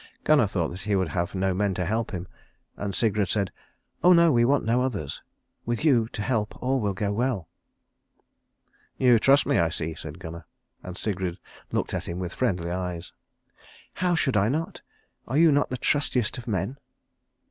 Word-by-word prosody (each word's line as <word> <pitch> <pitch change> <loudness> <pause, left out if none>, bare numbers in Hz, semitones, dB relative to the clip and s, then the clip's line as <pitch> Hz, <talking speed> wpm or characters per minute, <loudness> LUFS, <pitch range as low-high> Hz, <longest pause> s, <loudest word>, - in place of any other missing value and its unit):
Gunnar - - +4
thought - - -1
that 90 +2 -7
he 105 +2 0
would 95 -3 +1
have 85 +5 -2
no 95 0 +1
men 100 0 0
to 90 - -1
help 110 +5 -1
him, 90 -2 -5 0.5
and 100 -2 -4
Sigrid 110 -3 +1
said, 100 -3 0 0.5
"Oh 180 +1 +8
no, 170 -1 +6
we 120 -3 +4
want 140 +2 +2
no 120 +3 +2
others. 100 - -3 0.4
With 120 +6 -2
you 120 -7 +4
to 105 - -5
help 110 -3 -1
all 130 +1 +1
will 100 -2 -1
go 100 +2 -1
well." 115 -6 -1 1.5
"You 125 -3 +5
trust 135 +5 +5
me, - - +2
I 85 -1 +3
see," 80 0 -3
said 80 0 -8
Gunnar, 85 -2 -9 0.3
and 90 0 -8
Sigrid 95 -4 -2 0.3
looked - - -1
at - - -3
him 85 - -4
with 90 -1 -4
friendly 90 -9 -1
eyes. 90 -1 -4 0.8
"How 180 -1 +1
should 130 -6 +1
I 100 +2 +3
not? 160 +5 -3 0.5
Are 130 - -1
you 165 0 +6
not 145 0 +2
the 130 - -3
trustiest 125 -5 0
of 120 - -11
men?" 105 +5 -2
105 Hz, 185 wpm, -26 LUFS, 90-125 Hz, 1.5 s, Oh